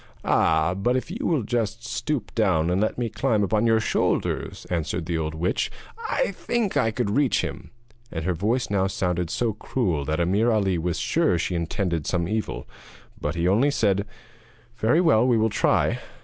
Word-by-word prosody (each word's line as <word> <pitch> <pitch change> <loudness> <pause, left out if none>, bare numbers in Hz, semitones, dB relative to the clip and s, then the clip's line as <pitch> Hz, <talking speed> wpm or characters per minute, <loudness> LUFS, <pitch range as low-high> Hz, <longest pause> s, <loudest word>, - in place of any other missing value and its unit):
'Ah, 80 +2 +3
but 120 +7 +1
if 130 - -4
you 245 +9 -3
will 155 -8 +1
just 115 0 -2
stoop 130 -3 -3
down 90 -7 +2
and 90 +2 +1
let 110 - 0
me 120 -1 -1
climb 110 0 0
upon 110 +3 +2
your 115 -1 +4
shoulders,' 115 - -1
answered 85 0 -2
the 85 +1 -2
old 80 -1 -2
witch, 85 +3 0 0.4
'I - - +1
think 235 -5 -2
I 115 - +3
could 110 -2 -1
reach 140 +3 +2
him.' - - -6 0.4
And 80 -1 -4
her 90 - +1
voice 110 +8 -1
now 95 -1 +2
sounded 90 -3 -1
so 115 +3 0
cruel 95 - -1
that 80 +3 -1
Ameer 100 +7 +2
Ali 100 -6 +1
was 85 +1 -1
sure - - +1
that - - +2
she 85 - -2
intended 85 -1 -2
some 85 -2 0
evil. 110 +2 -3 0.5
But 75 +3 -2
he 85 +1 0
only 115 +10 +4
said: 105 -8 +1 0.7
'Very 120 +9 +3
well, 125 -9 +4
we 120 -2 +4
will 110 0 +2
try.' 105 - +2
105 Hz, 190 wpm, -24 LUFS, 90-120 Hz, 0.7 s, your